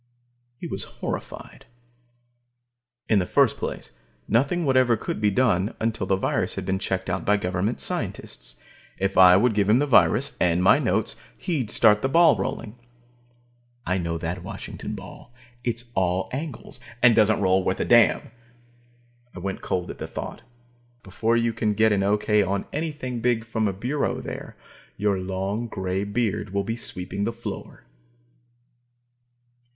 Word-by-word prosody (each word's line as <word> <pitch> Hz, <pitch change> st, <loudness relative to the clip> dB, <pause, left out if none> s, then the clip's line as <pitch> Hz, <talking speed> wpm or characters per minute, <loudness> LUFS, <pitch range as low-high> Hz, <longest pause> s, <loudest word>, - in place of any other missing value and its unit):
He -, -, -8 dB
was -, -, -2 dB
horrified. -, -, -7 dB, 1.4 s
In 105 Hz, -, +4 dB
the 90 Hz, -, -1 dB
first -, -, +3 dB
place, -, -, -5 dB, 0.4 s
nothing 145 Hz, +9 st, +1 dB
whatever 130 Hz, -4 st, +3 dB
could 105 Hz, -, -4 dB
be 105 Hz, -, +4 dB
done 105 Hz, -3 st, +1 dB
until 110 Hz, -4 st, -1 dB
the 95 Hz, -, +3 dB
virus 95 Hz, -, -1 dB
had -, -, -4 dB
been 95 Hz, 0 st, -1 dB
checked 95 Hz, -1 st, -2 dB
out 95 Hz, +1 st, -2 dB
by 105 Hz, +1 st, +3 dB
government 95 Hz, +4 st, -2 dB
scientists. -, -, -4 dB, 0.4 s
If 95 Hz, 0 st, -1 dB
I 90 Hz, -1 st, +8 dB
would 115 Hz, +3 st, +3 dB
give 100 Hz, -1 st, +1 dB
him 110 Hz, -, +6 dB
the 145 Hz, -, +2 dB
virus, 120 Hz, -, +3 dB
and 90 Hz, 0 st, +2 dB
my -, -, +6 dB
notes, -, -, 0 dB, 0.2 s
he'd 145 Hz, -, -2 dB
start 105 Hz, -3 st, +5 dB
the 135 Hz, -, 0 dB
ball 165 Hz, +1 st, +6 dB
rolling. 115 Hz, +1 st, -5 dB, 1.1 s
I 90 Hz, +1 st, 0 dB
know 85 Hz, -1 st, -2 dB
that 85 Hz, +2 st, -4 dB
Washington -, -, -7 dB
ball; 120 Hz, -, -12 dB, 0.3 s
it's 120 Hz, 0 st, -3 dB
all 95 Hz, -1 st, 0 dB
angles, 135 Hz, -3 st, -6 dB, 0.2 s
and 120 Hz, -2 st, +7 dB
doesn't 110 Hz, -1 st, +4 dB
roll 95 Hz, -1 st, +2 dB
worth 95 Hz, -, -1 dB
a -, -, 0 dB
damn. 120 Hz, -1 st, +4 dB, 1.0 s
I -, -, -9 dB
went 95 Hz, +2 st, -4 dB
cold 90 Hz, -1 st, -2 dB
at -, -, -12 dB
the -, -, -5 dB
thought. -, -, -7 dB, 0.6 s
Before 110 Hz, +5 st, 0 dB
you 115 Hz, 0 st, +1 dB
can 110 Hz, -2 st, 0 dB
get 110 Hz, +1 st, +4 dB
an 100 Hz, -1 st, +2 dB
okay 105 Hz, +1 st, +2 dB
on 100 Hz, 0 st, -1 dB
anything 145 Hz, -5 st, -3 dB
big 115 Hz, -1 st, 0 dB
from 110 Hz, -1 st, -1 dB
a -, -, 0 dB
bureau 125 Hz, +10 st, -2 dB
there, -, -, -8 dB, 0.4 s
your 100 Hz, -1 st, +1 dB
long, 95 Hz, +5 st, -3 dB
grey 95 Hz, -2 st, -2 dB
beard 105 Hz, -1 st, -1 dB
will 100 Hz, -, +1 dB
be 115 Hz, +3 st, -3 dB
sweeping 95 Hz, -3 st, -4 dB
the 115 Hz, -, 0 dB
floor. 115 Hz, +1 st, -8 dB
105 Hz, 160 wpm, -24 LUFS, 95-120 Hz, 1.4 s, I